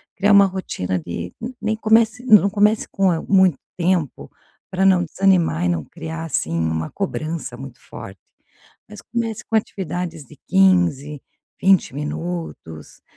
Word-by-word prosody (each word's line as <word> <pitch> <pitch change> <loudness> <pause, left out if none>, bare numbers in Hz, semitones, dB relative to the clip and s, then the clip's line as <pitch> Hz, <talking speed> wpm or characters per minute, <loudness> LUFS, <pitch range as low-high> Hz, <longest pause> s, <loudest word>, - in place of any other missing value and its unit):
criar 200 +1 +2
uma 200 0 +7
rotina 180 - -3
de 85 +1 -6 0.3
nem 220 0 -1
comece 220 +2 +2
não 210 -4 +6
comece 210 +2 +2
com 195 -1 +2
a 165 - -1
muito 190 -6 +3 0.2
tempo 175 -5 -1 0.4
pra 190 +1 0
não 185 -2 +4
desanimar 175 - +1
e - - +2
não 85 -3 -1
criar 160 - -7
assim, 115 - -2
uma 80 -1 -2
cobrança 160 -8 -4
muito 130 -1 -10
forte. 95 -1 -11 0.7
Mas 210 -1 -11
comece 230 -2 -4
com - - -5
atividades 175 -6 -3
de 150 - -17
15, 175 -7 +2 0.4
20 190 -8 +3
minutos, 150 - -6
175 Hz, 140 wpm, -20 LUFS, 140-195 Hz, 0.7 s, uma